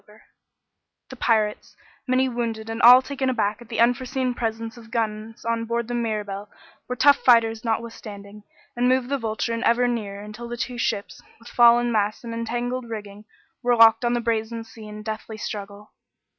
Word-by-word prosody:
The - - -7
pirates, 220 -4 0 0.3
many 260 +1 +2
wounded 230 -3 -3
and 225 +1 -4
all 250 +2 +9
taken 270 -1 -2
aback 215 -3 -1
at 235 - -14
the 230 - -4
unforeseen 250 +1 +1
presence 225 -1 -4
of 230 -2 -14
guns 225 -1 -3
on 230 0 -1
board 235 0 -2
the 245 - -4
Mirabelle, 210 -4 -3 0.4
were 250 - -3
tough 280 +3 +5
fighters 230 -2 +3
notwithstanding, 210 -3 -5 0.3
and 245 +1 +2
moved 255 -1 +1
the 280 -1 0
Vulture 225 0 -2
in 230 - -3
ever 245 +1 +3
nearer 205 -4 -3
until 215 +3 -8
the 240 0 -6
two 245 0 -4
ships, 200 -6 -2 0.2
with 235 - -14
fallen 240 0 +5
masts 210 0 0
and 230 -1 -6
entangled 240 +2 -3
rigging, 210 -1 -8 0.4
were 245 -1 +2
locked 225 0 +6
on 240 0 +1
the 240 - 0
brazen 230 0 -2
sea 225 -1 -12
in 210 0 -9
deathly 220 0 -6
struggle. 205 -1 -7
230 Hz, 175 wpm, -24 LUFS, 215-240 Hz, 0.4 s, all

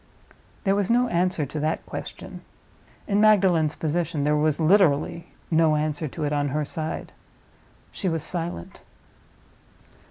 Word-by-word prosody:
There 195 - +2
was 200 -1 0
no 245 +1 +3
answer 175 -3 0
to 150 +3 -5
that 155 +2 -1
question: - - -8 0.7
in 205 0 +2
Magdalen's 185 -8 +4
position, 160 -1 -1
there 150 +1 +2
was 150 0 +1
literally 170 -2 +3 0.2
no 160 -1 +4
answer 150 +1 -1
to 155 +3 -6
it 145 0 -1
on 145 -1 0
her 150 +2 -1
side. 155 +2 -5 0.8
She 190 - -2
was 165 -2 -2
silent. 165 - -4
160 Hz, 135 wpm, -24 LUFS, 150-180 Hz, 0.8 s, Magdalen's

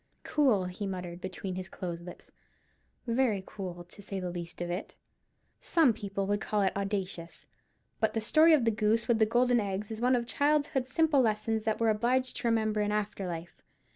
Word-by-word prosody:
"Cool," 255 -11 +2
he 180 +3 -4
muttered 180 -2 -5
between 185 0 -5
his 185 +1 -6
closed 175 -3 -5
lips; 180 - -11 0.7
"very 230 -5 +1
cool, 180 -4 -7
to 180 +4 -14
say 195 -1 -5
the 180 -1 -3
least 175 -1 -7
of 175 0 -3
it. 180 +4 -5 0.7
Some 315 -8 +3
people 200 -2 -3
would 205 0 0
call 210 -2 0
it 190 - +1
audacious. 195 -4 -4 0.5
But 220 0 +1
the - - +2
story 315 +8 +5
of 280 -7 +4
the 225 - +4
goose 215 +1 +1
with 235 -2 +3
the 220 - +4
golden 245 +2 +3
eggs 200 0 -3
is 220 0 -5
one 250 +1 +4
of 240 -1 0
childhood's 285 -1 +1
simple 305 -1 +3
lessons 220 -1 0
that 220 -1 0
we're 230 -1 +3
obliged 245 +4 +1
to - - -1
remember 220 -2 +1
in 210 0 0
after 210 -2 -2
life. 170 0 -7
210 Hz, 195 wpm, -30 LUFS, 190-235 Hz, 0.7 s, story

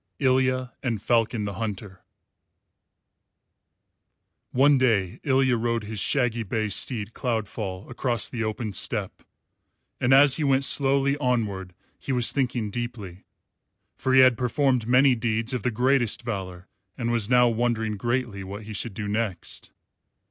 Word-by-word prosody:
ILYA 130 -2 +1
AND 120 -5 -2
FALCON 115 0 0
THE 100 - -4
HUNTER 100 -3 -6 2.5
One 140 +1 +4
day 105 -8 +1
Ilya 130 -2 +2
rode 115 0 -1
his 105 0 -5
shaggy 120 -1 +1
bay 110 0 -2
steed 110 +1 -2
Cloudfall 105 -5 -4
across 120 -2 -1
the 115 -2 -4
open 110 0 -3
steppe; - - -3 0.8
and 125 - +1
as 140 0 +6
he 155 - -1
went 135 -1 +2
slowly 140 0 +3
onward 105 -9 -2 0.2
he - - -5
was 125 -2 +3
thinking 120 -6 -1
deeply, 105 -6 -6 0.7
for 130 0 0
he 130 - +8
had 130 -2 +5
performed 125 -2 +1
many 130 +2 +5
deeds 115 +1 -1
of 125 - -2
the 125 - 0
greatest 125 0 +1
valour, 95 -5 -6 0.3
and 120 -2 -2
was 115 -3 0
now 125 -1 +5
wondering 115 -2 -1
greatly 120 -2 -2
what 100 +3 -8
he 110 +1 -8
should 105 0 -4
do 110 -2 -4
next. 105 -2 -3
120 Hz, 140 wpm, -25 LUFS, 105-130 Hz, 2.5 s, he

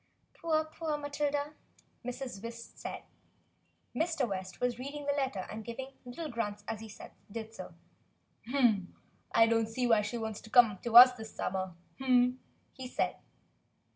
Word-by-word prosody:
"Poor, 315 -2 0
poor 315 -1 -3
Matilda," 290 0 -2 0.5
Mrs. 250 -4 -5
West 230 0 -9
said. - - -6 0.9
Mr. 320 -6 +1
West 190 -2 -5
was 245 -1 0
reading 285 +3 -6
the 285 - +2
letter 265 -9 -1
and 220 +1 -7
giving 260 +4 -6
little 280 +7 -5
grunts 210 -5 -3
as 225 - -3
he 220 -1 -9 0.4
did 225 0 -6
so. - - -9 1.6
"I 225 - +6
don't 225 -1 +2
see 245 +3 -1
why 225 -3 +5
she 210 +3 -3
wants 220 -2 -4
to 220 - -13
come 220 -5 +6
to 235 -1 +4
us 250 +1 +12
this 220 -3 -10
sum - - -2
mer," 185 -2 -3 1.0
he 260 -2 -7
said. - - -1
240 Hz, 150 wpm, -32 LUFS, 220-280 Hz, 1.6 s, us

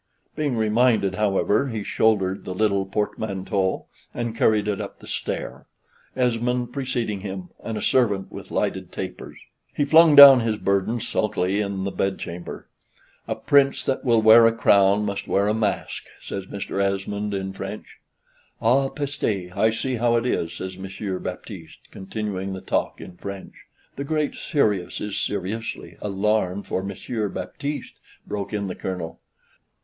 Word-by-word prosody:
Being 145 -6 -1
reminded, 110 -2 +3
however, 105 +5 +1
he 110 -3 -3
shouldered 100 -3 +1
the 90 - -5
little 100 -1 +1
portmanteau, 95 -2 -2 0.3
and 120 -2 -3
carried 110 -2 +2
it 105 -2 -1
up - - -7
the - - -15
stair, - - -5 0.5
Esmond 125 0 0
preceding 120 -6 -2
him, 95 -2 -6
and 110 -1 -4
a - - -4
servant 105 -7 +2
with - - -9
lighted - - -2
tapers. - - -7 0.4
He 145 - +1
flung 160 +1 +7
down 140 -2 +12
his 115 -2 0
burden 100 +4 0
sulkily 95 +2 0
in 100 -2 -3
the 100 - -2
bedchamber: 90 -3 -4 0.6
"A - - -1
Prince 140 -1 +3
that 135 - -1
will 115 -3 +3
wear 115 +1 +8
a - - +4
crown 100 -2 +4
must 100 -1 -3
wear 100 +1 +2
a 105 - +2
mask," 110 -2 -2
says 95 -1 -6
Mr. 100 0 -3
Esmond 100 +1 -1
in 95 0 -3
French. - - -8 0.6
"Ah 135 +4 +3
peste! 110 - -3
I 110 - +3
see 125 +3 -2
how 120 +1 +2
it 115 +1 +1
is," 85 -9 -1
says 95 +2 -6
Monsieur 95 0 -4
Baptiste, - - -8
continuing 95 -1 -4
the 95 - -6
talk - - -1
in 90 -1 -10
French. 100 0 -7 0.4
"The 140 - -2
Great 150 0 -1
Serious 105 - 0
is 105 -1 -3
seriously" 105 +3 -4
"alarmed 100 -1 0
for 95 - -2
Monsieur 105 +2 -3
Baptiste," 145 +8 -5 0.3
broke 100 -2 -4
in 105 -2 -2
the 95 - -3
Colonel. 90 -4 -5
105 Hz, 155 wpm, -24 LUFS, 95-120 Hz, 0.6 s, down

